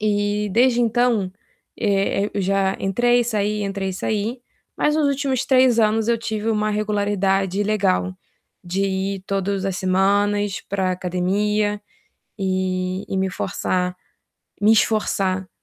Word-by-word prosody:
E, 205 0 0
desde 245 +2 +4
então, 230 -4 +1 0.5
eh, 200 -2 +1
eh, 205 - -3
eu 200 - 0
já 195 0 +1
entrei 240 +5 +2
e - - 0
saí, 210 -2 -1
entrei 195 -1 -2
e - - -5
saí, 215 +5 -2 0.4
mas 300 - +2
nos 305 -2 +2
últimos 275 -2 0
3 255 -3 +4
anos 220 0 +2
eu 235 -1 +2
tive 220 -1 -3
uma 215 -1 0
regularidade 205 -2 0
legal, 195 -3 +1 0.5
de 180 +1 -3
ir 195 0 -2
todos 195 0 -1
as 195 -2 -1
semanas 200 +2 +1
pra 190 -2 0
academia. 205 +4 0 0.6
E 185 0 -1
e 195 - -1
me 190 0 0
forçar 180 -1 -2 0.7
me 210 +2 +5
esforçar 195 -4 +1
205 Hz, 140 wpm, -21 LUFS, 190-215 Hz, 0.7 s, me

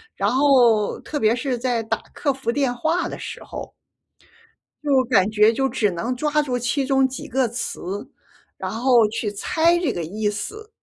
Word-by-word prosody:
然 - - +1
后 250 -6 +4
特 295 - -4
别 220 0 +3
是 250 0 -2
在 240 -2 0
打 220 - -1 0.2
客 280 -2 0
服 265 -3 -2
电 265 -2 0
话 320 +8 0
的 - - -7
时 - - -7
候， - - -8 1.1
就 270 -3 +4
感 205 -5 +3
觉 215 +1 +4
就 270 +3 0
只 210 -6 +1
能 230 +9 -3
抓 300 +2 +1
住 255 -3 -2
其 250 +3 -1
中 270 -1 +3
几 260 - -7
个 255 -1 +1
词， 205 -4 -5 0.5
然 - - -4
后 235 -1 +3
去 215 -1 -3
猜 335 - +2
这 320 -8 0
个 170 - -4
意 210 +5 -2
思。 425 - -7
250 Hz, 195 characters per minute, -22 LUFS, 220-275 Hz, 1.1 s, 后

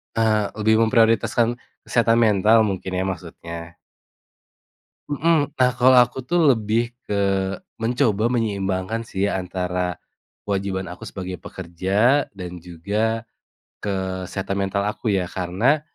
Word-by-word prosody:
Eee, 110 -2 +2
lebih 110 +1 +2
memprioritaskan 115 +1 +3 0.2
kesehatan 115 -1 +2
mental 110 +1 +5
mungkin 95 -2 -2
ya 90 - 0
maksudnya? 85 -2 -6 1.3
Mhm, 145 0 +1
nah 125 0 +5
kalau 125 0 +6
aku 125 +1 0
tuh 175 +7 +1 0.2
lebih 110 +2 0 0.2
ke 100 -1 -1 0.6
mencoba 115 -1 +1
menyeimbangkan 100 -1 -1
sih 100 -2 -1
antara 90 -1 -2 0.5
kewajiban 95 -1 -2
aku 90 - -9
sebagai 95 -1 -6
pekerja 95 - 0
dan 90 -3 -7
juga 100 +7 -2 0.6
kesehatan 95 0 -3
mental 100 +1 -1
aku 105 +2 -3
ya. 95 - 0
Karena 95 - 0
100 Hz, 115 wpm, -22 LUFS, 95-115 Hz, 1.3 s, kalau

